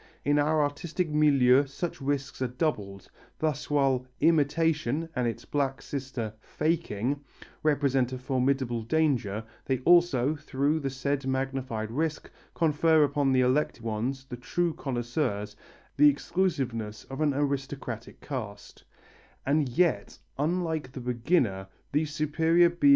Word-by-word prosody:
In 145 +1 +3
our 150 +1 +3
artistic 160 +4 -2
milieu 140 -3 +5
such 160 +3 -5
risks 135 -1 -2
are 130 - +1
doubled, 105 - -3 0.3
thus 155 -3 -2
while 135 -3 +2
"imitation," 155 -1 +2
and 125 -2 +1
its 115 - -4
black 140 -2 -1
sister 130 -6 -5
"faking," 145 -3 -1 0.4
represent 140 -4 +2
a 130 - -3
formidable 130 -2 0
danger, 120 -5 0 0.2
they 130 - +1
also, 155 -4 +4
through 145 +1 0
the 140 -2 -2
said 135 +1 -2
magnified 130 -4 -2
risk, 155 +4 -2 0.2
confer 160 0 +4
upon 145 -1 +1
the 130 -1 +4
elect 130 +3 +1
ones, 120 +4 -3
the 130 -2 -7
true 170 +7 -1
connoisseurs, 120 -6 -2 0.4
the 150 +1 +8
exclusiveness 135 - -1
of 135 +3 -7
an 145 -3 +2
aristocratic 135 -5 -3
caste. 110 -8 -7
135 Hz, 105 wpm, -28 LUFS, 125-150 Hz, 0.4 s, the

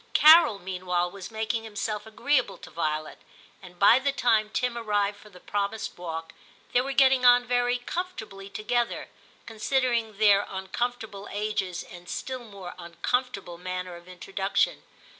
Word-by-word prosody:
Carol 310 -8 +8
meanwhile 180 -1 -2
was 195 -1 -8
making 220 +1 -2
himself 210 -1 -4
VIII 220 - -13
TIM - - -17
1 - - -15
75 290 +1 +5
agreeable 195 - -10
to - - -12
Violet, 155 -1 -2 0.4
and 180 -2 -13
by 205 +6 +7
the 280 +1 +1
time 225 -5 +2
Tim 250 +2 -1
arrived 205 -3 0
for 210 - -16
the 180 -3 -15
promised 205 +3 -3
walk, 165 -2 -6 0.4
they 245 - +5
were 275 +2 -3
getting 265 -1 +4
on 245 0 +7
very 245 +1 +1
comfortably 245 - -6
together, 230 +4 -1 0.4
con 225 - -10
sidering 235 -3 0
their 205 -1 +5
uncomfortable 205 +2 -4
ages 205 -4 -2
and 175 -1 -12
still 255 -2 -4
more 200 -5 -9
uncomfortable 175 +2 -2
manner 180 0 -5
of 175 +1 -14
introduction. 190 +2 -1
210 Hz, 160 wpm, -27 LUFS, 185-245 Hz, 0.4 s, Carol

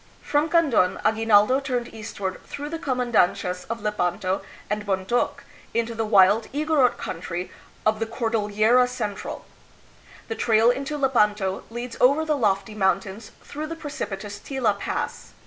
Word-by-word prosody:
From 295 +2 +1
Kandon, 295 - +3
Aguinaldo 220 +3 +4
turned 250 -4 -3
eastward 200 -3 -5
through 290 +1 -6
the 330 +1 -4
comandancias 240 - +1
of 230 -2 -4
Lepanto 185 -2 -1 0.3
and 210 0 -2
Bontok, 195 +4 -1 0.3
into 230 0 0
the 225 -1 -2
wild 205 +2 +5
Igorot 295 -3 +2
country 175 +1 -5 0.3
of 215 0 +2
the 225 - -1
Cor 230 0 -2
dillera 220 +3 +3
Central. 215 -5 -5 0.8
The - - -2
trail 230 - +4
into 275 +4 -3
Lepanto 210 -8 +1
leads 240 +1 -6
over 280 +5 +4
the 305 -1 +1
lofty 210 -4 0
mountains 195 +1 -1
through 305 +2 -6
the 330 - -5
precipitous 205 -10 -6
Tila 225 -6 -1
Pass. - - -4
225 Hz, 140 wpm, -24 LUFS, 205-260 Hz, 0.8 s, wild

